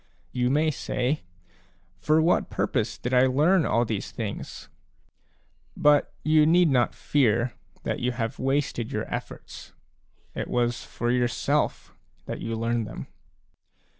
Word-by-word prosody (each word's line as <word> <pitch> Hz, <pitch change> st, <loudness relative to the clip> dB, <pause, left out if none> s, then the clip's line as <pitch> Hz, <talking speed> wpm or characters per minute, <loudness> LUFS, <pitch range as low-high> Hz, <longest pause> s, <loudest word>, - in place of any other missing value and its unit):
You 125 Hz, -1 st, 0 dB
may 155 Hz, +3 st, +2 dB
say: 130 Hz, +1 st, -2 dB, 0.4 s
" 90 Hz, 0 st, -37 dB
For 155 Hz, +1 st, +3 dB
what 170 Hz, -, +2 dB
purpose -, -, -1 dB
did 125 Hz, -, -4 dB
I 125 Hz, +1 st, +5 dB
learn 155 Hz, +6 st, +3 dB
all 115 Hz, +3 st, +2 dB
these 110 Hz, -3 st, -3 dB
things? 105 Hz, -3 st, -6 dB, 0.5 s
" 75 Hz, 0 st, -34 dB
But 145 Hz, -1 st, +5 dB
you 155 Hz, 0 st, +4 dB
need 175 Hz, 0 st, +5 dB
not 125 Hz, -2 st, +2 dB
fear 120 Hz, -3 st, +1 dB, 0.3 s
that -, -, -2 dB
you 125 Hz, +1 st, 0 dB
have 115 Hz, -2 st, -3 dB
wasted 135 Hz, -3 st, -1 dB
your 110 Hz, -3 st, -2 dB
efForts; -, -, -7 dB, 0.6 s
it -, -, -4 dB
was 120 Hz, 0 st, 0 dB
for 120 Hz, +1 st, -2 dB
yourself 125 Hz, +4 st, 0 dB, 0.3 s
that -, -, -5 dB
you 115 Hz, -, -3 dB
learned 115 Hz, 0 st, -1 dB
them. -, -, -8 dB
125 Hz, 140 wpm, -26 LUFS, 115-145 Hz, 0.6 s, I